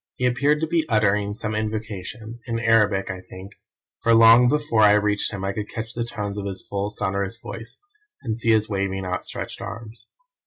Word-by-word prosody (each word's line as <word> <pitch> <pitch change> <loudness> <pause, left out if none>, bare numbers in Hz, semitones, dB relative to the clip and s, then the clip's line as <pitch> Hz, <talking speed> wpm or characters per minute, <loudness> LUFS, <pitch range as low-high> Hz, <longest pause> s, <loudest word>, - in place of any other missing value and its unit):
He 125 - -1
appeared 140 +5 +2
to 160 - 0
be 165 0 +1
uttering 105 -2 +2
some 110 -2 -4
invocation 110 +1 -5
in 115 -1 -1
Arabic, 105 -4 +2
I 95 0 -7
think 95 +2 -11 0.5
for 115 0 +4
long 115 +2 +8
before 145 -5 +1
I 105 -1 +7
reached 105 0 +1
him 95 -1 -4
I 100 - -1
could 105 0 -5
catch 110 0 -6
the 120 - -2
tones 105 -3 -4
of 100 - -4
his 95 -1 -6
full, 100 0 -2
sonorous 100 0 -2
voice, 115 0 -8 0.4
and 110 -3 -2
see 115 0 -1
his 110 -1 +4
waving, 95 -2 -2
outstretched 90 0 -5
arms. 115 0 -9
110 Hz, 190 wpm, -23 LUFS, 100-115 Hz, 0.5 s, long